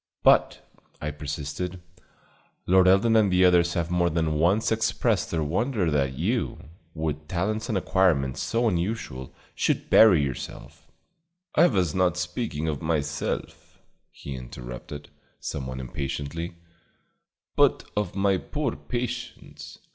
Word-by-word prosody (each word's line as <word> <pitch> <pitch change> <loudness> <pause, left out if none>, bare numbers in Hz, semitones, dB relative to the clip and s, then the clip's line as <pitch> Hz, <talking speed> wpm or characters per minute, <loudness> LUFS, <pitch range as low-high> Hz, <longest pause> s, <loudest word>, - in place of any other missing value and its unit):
"But," - - +3 0.3
I 75 - -3
persisted, 75 +5 -5 0.9
"Lord 95 0 +5
Eldon 100 +5 +4
and 105 -3 +4
others 90 -1 +4
have 85 0 -1
more 85 -1 +2
than 80 -1 0
once 90 +10 +2
expressed 110 -1 +1
their 80 -2 -1
wonder 95 - 0
that 70 -3 0
you, - - -2 0.3
with 75 -1 -3
talents 105 +7 -2
and 110 - +1
acquirements 85 -9 +1
so 115 +1 +1
unusual, 85 - -2 0.2
should - - -1
bury 95 -9 +7
yourself 65 -3 -7 0.3
" - - -53 0.3
"I 170 +3 +6
was 90 - +1
not 90 -2 +2
speaking 90 -5 -3
of 75 -3 -2
myself," 75 -2 -3 0.3
he 70 - -8
interrupted, 65 +3 -8 0.3
somewhat 65 -2 -5
impatiently, 70 +6 -4 1.0
"but - - +3
of 105 -4 -2
my 95 -1 +2
poor 145 0 -3
patients. 120 0 -6
85 Hz, 125 wpm, -26 LUFS, 75-100 Hz, 1.0 s, bury